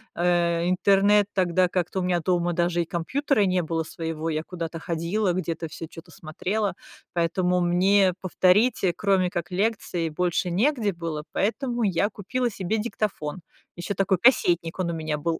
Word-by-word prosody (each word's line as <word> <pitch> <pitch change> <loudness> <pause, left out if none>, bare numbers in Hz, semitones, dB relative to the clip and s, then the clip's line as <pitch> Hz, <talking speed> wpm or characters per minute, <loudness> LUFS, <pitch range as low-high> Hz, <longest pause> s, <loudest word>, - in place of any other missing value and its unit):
Э, 170 0 +1
интернет 200 +2 +4
тогда 185 -1 +2
как-то 180 +1 -2
у - - -1
меня 180 -2 +1
дома 175 0 0
даже 175 0 +1
и 170 - -2
компьютера 245 - 0
не 185 -2 +2
было 165 0 -2
своего, 165 0 -4
я 155 0 -2
куда-то 165 -2 -6
ходила, 175 +4 -1
где-то 165 -2 -3
всё 160 +1 -8
чё-то 165 +2 -13
смотрела. 190 +6 -3 0.4
Поэтому 180 +1 +1
мне 185 +2 +3
повторить, 190 +6 +3
кроме 195 -3 +2
как 175 0 -4
лекции, 185 -3 -1
больше 175 +2 -1
негде 220 - +1
было, 165 -3 -5
поэтому 240 +3 -1
я 200 +1 +1
купила 240 +5 -2
себе 195 +1 -2
диктофон. 205 -7 -3 0.3
Ещё 175 +3 -4
такой 195 -1 +2
кассетник, 175 -8 +3
он 175 -2 0
у - - -4
меня 155 -2 -2
был, 165 +2 -2
180 Hz, 160 wpm, -25 LUFS, 170-200 Hz, 0.4 s, интернет